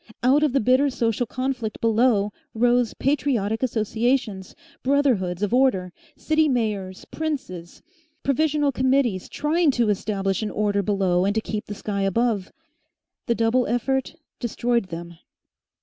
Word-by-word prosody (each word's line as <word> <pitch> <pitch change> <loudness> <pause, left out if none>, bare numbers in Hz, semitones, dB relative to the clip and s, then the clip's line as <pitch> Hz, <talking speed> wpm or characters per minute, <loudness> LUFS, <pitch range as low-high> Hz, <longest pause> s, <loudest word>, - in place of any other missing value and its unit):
Out 265 +4 +4
of 300 -4 +2
the 275 - +3
bitter 260 +5 +3
social 235 -2 -1
conflict 255 -3 -3
below 225 -2 +2 0.2
rose 240 0 +2
patriotic 245 -6 0
associations, 225 -3 -1 0.3
brotherhoods 240 -10 +1
of 205 - -1
order, 225 -9 +2 0.2
city 315 -1 +2
mayors, 210 -7 -2
princes, 250 - -5 0.4
provisional 295 +1 +1
committees, 255 -7 +1
trying 315 +2 +1
to 240 -5 +2
establish 195 -1 -1
an 215 - -2
order 205 -1 0
below 190 -3 +1
and 200 +2 0
to - - +3
keep 215 -1 -5
the 205 - -6
sky 200 -1 -3
above. 200 0 0 0.8
The 235 - +2
double 230 +2 +2
effort 265 +5 -1 0.2
destroyed 235 -1 0
them. 170 -1 -8
230 Hz, 135 wpm, -23 LUFS, 200-265 Hz, 0.8 s, Out